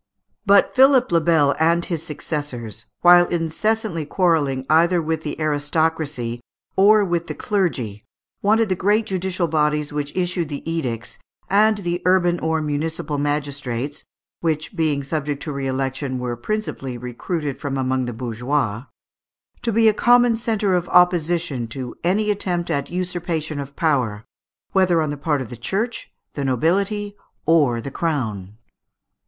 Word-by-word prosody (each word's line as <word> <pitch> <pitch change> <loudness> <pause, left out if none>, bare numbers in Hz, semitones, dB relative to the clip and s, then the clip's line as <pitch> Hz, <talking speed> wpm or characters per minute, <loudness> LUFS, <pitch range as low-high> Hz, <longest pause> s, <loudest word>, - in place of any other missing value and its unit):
But 200 0 +5
Philippe 265 -1 +5
le 170 -1 +4
Bel 150 -3 +3
and 170 +2 +3
his 165 -4 -3
successors, 135 - -5 0.2
while 175 0 +7
incessantly 175 +2 -1
quarrelling 145 -5 +1
either 170 +3 +4
with 160 -1 -2
the 150 -1 -5
aristocracy 145 -5 -1 0.3
or 205 +2 +5
with 170 -2 -1
the - - -5
clergy, 130 - -2 0.4
wanted 215 +1 +3
the 185 - +1
great 210 +4 +2
judicial 185 -2 -1
bodies 150 -1 0
which 145 +2 -4
issued 180 -3 -1
the 145 +1 -6
edicts, 130 -9 -3 0.3
and 215 +2 +4
the 175 -3 -3
urban 175 -1 +3
or 160 0 0
municipal 150 0 -2
magistrates 145 -2 -2 0.4
which, 160 +2 -2
being 155 -4 0
subject 145 0 -3
to 155 - -4
re 140 -1 -3
election, 135 0 -2
were 125 -1 -3
principally 135 - -4
recruited 135 +4 -4
from 140 -1 -3
among 130 -1 0
the 120 - -4
bourgeois 120 0 -2 0.8
to 230 - 0
be 225 +1 +4
a 215 - +5
common 245 +1 +4
centre 220 -4 0
of 175 -1 0
opposition 170 -7 +2
to 125 +2 -6
any 210 +5 +2
attempt 175 -4 -1
at 140 -3 -1
usurpation 175 -4 -3
of 140 0 -7
power, 125 - 0 0.5
whether 185 -3 +3
on 155 -2 0
the - - -3
part 145 -1 -1
of 125 - -12
the - - -6
Church, 200 - -3 0.2
the 140 - -3
nobility, 195 - 0 0.3
or 150 -7 +3
the 135 +4 -6
crown. 110 - -3
160 Hz, 150 wpm, -21 LUFS, 140-180 Hz, 0.8 s, while